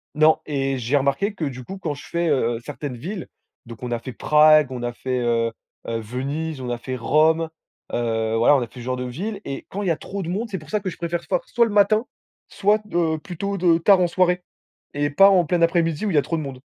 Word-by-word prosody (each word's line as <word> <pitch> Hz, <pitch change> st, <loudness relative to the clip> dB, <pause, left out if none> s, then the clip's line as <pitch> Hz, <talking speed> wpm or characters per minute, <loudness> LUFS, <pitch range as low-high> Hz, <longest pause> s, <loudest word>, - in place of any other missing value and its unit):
Non, 155 Hz, +1 st, +5 dB
et 135 Hz, -2 st, -1 dB
j'ai 125 Hz, +3 st, -1 dB
remarqué 140 Hz, +10 st, 0 dB
que, 170 Hz, -6 st, -3 dB
du 130 Hz, -2 st, -5 dB
coup, 195 Hz, +9 st, -8 dB
quand 155 Hz, -6 st, -3 dB
je -, -, -11 dB
fais, 170 Hz, 0 st, -1 dB
heu, 120 Hz, -5 st, +1 dB
certaines 140 Hz, +1 st, -6 dB
villes, 180 Hz, -, -6 dB, 0.4 s
donc 115 Hz, 0 st, -11 dB
on 125 Hz, -, -4 dB
a 120 Hz, -, 0 dB
fait 125 Hz, +2 st, -8 dB
Prague, 150 Hz, 0 st, +5 dB
on 125 Hz, -2 st, -5 dB
a 120 Hz, 0 st, -2 dB
fait, 130 Hz, +1 st, -3 dB
heu, 115 Hz, -1 st, +1 dB, 0.4 s
heu, 115 Hz, 0 st, -2 dB
Venise, 135 Hz, +6 st, -4 dB
on 125 Hz, -, -4 dB
a 120 Hz, -, -2 dB
fait 130 Hz, +2 st, -5 dB
Rome, 155 Hz, +6 st, +2 dB, 0.4 s
heu, 115 Hz, -2 st, 0 dB
voilà, 115 Hz, +6 st, +5 dB
on 135 Hz, -, +2 dB
a 120 Hz, -, -3 dB
fait -, -, -23 dB
ce 120 Hz, -, -8 dB
genre 130 Hz, 0 st, -1 dB
de 125 Hz, -, -3 dB
ville, 195 Hz, -, -5 dB
et 135 Hz, -, -6 dB
quand 205 Hz, -, -4 dB
il 195 Hz, -, -2 dB
y -, -, +3 dB
a 160 Hz, -, 0 dB
trop 200 Hz, 0 st, -6 dB
de 170 Hz, -, -5 dB
monde, 215 Hz, +6 st, -2 dB
c'est 190 Hz, -4 st, -4 dB
pour 155 Hz, -, -15 dB
ça 210 Hz, -, 0 dB
que 190 Hz, -, -3 dB
je -, -, -11 dB
préfère 170 Hz, 0 st, -3 dB
for -, -, 0 dB
soit 235 Hz, -1 st, +3 dB
le 225 Hz, -, -3 dB
matin, 210 Hz, +3 st, +3 dB, 0.4 s
soit, 210 Hz, +2 st, +2 dB
heu, 165 Hz, -2 st, +1 dB
plutôt 200 Hz, +5 st, -4 dB
de 170 Hz, -2 st, +3 dB
tard 185 Hz, +2 st, +5 dB
en 175 Hz, -, +3 dB
soirée, 180 Hz, 0 st, +1 dB, 0.5 s
et 145 Hz, 0 st, 0 dB
pas 195 Hz, +7 st, +7 dB
en 185 Hz, -3 st, +4 dB
plein 170 Hz, +2 st, 0 dB
après-midi 165 Hz, +2 st, +1 dB
où -, -, 0 dB
il -, -, -2 dB
y -, -, +5 dB
a -, -, +4 dB
trop 165 Hz, -, -2 dB
de -, -, -3 dB
monde. 135 Hz, -3 st, -7 dB
155 Hz, 265 wpm, -22 LUFS, 125-180 Hz, 0.5 s, pas